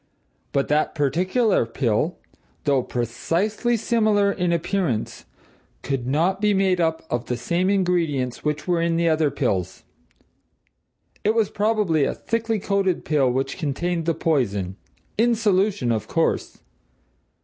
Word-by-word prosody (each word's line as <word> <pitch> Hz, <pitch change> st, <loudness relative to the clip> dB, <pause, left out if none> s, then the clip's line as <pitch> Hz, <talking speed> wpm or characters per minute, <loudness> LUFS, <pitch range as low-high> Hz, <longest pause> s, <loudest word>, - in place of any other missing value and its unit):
But 140 Hz, -1 st, 0 dB
that 150 Hz, +1 st, +1 dB
particular 185 Hz, -, +2 dB
pill, 125 Hz, +7 st, 0 dB, 0.5 s
though 140 Hz, -3 st, +2 dB
precisely 165 Hz, -, -1 dB
similar 215 Hz, -3 st, +2 dB
in 180 Hz, -3 st, -1 dB
appearance, 170 Hz, -, -1 dB, 0.6 s
could 135 Hz, -3 st, -2 dB
not 170 Hz, +8 st, +1 dB
be 210 Hz, -1 st, +3 dB
made 190 Hz, -2 st, +2 dB
up 160 Hz, -1 st, 0 dB
of 120 Hz, -1 st, -2 dB
the 125 Hz, -, -2 dB
same 170 Hz, +9 st, 0 dB
ingredients 170 Hz, -10 st, 0 dB
which 150 Hz, +2 st, -2 dB
were 175 Hz, -2 st, +2 dB
in 170 Hz, 0 st, +1 dB
the 170 Hz, 0 st, +2 dB
other 155 Hz, -2 st, +3 dB
pills. 100 Hz, -, -2 dB, 1.4 s
It 215 Hz, +2 st, +2 dB
was 225 Hz, -3 st, +1 dB
probably 210 Hz, -7 st, +1 dB
a -, -, -2 dB
thickly 225 Hz, -1 st, -1 dB
coated 195 Hz, -2 st, 0 dB
pill 145 Hz, -4 st, +2 dB
which 135 Hz, +5 st, -2 dB
contained 165 Hz, +2 st, -2 dB
the 165 Hz, -, +2 dB
poison; 100 Hz, -, 0 dB, 0.4 s
in 235 Hz, +1 st, +4 dB
solution 200 Hz, -, +1 dB
of 110 Hz, -2 st, -2 dB
course. -, -, -1 dB
170 Hz, 135 wpm, -23 LUFS, 135-200 Hz, 1.4 s, in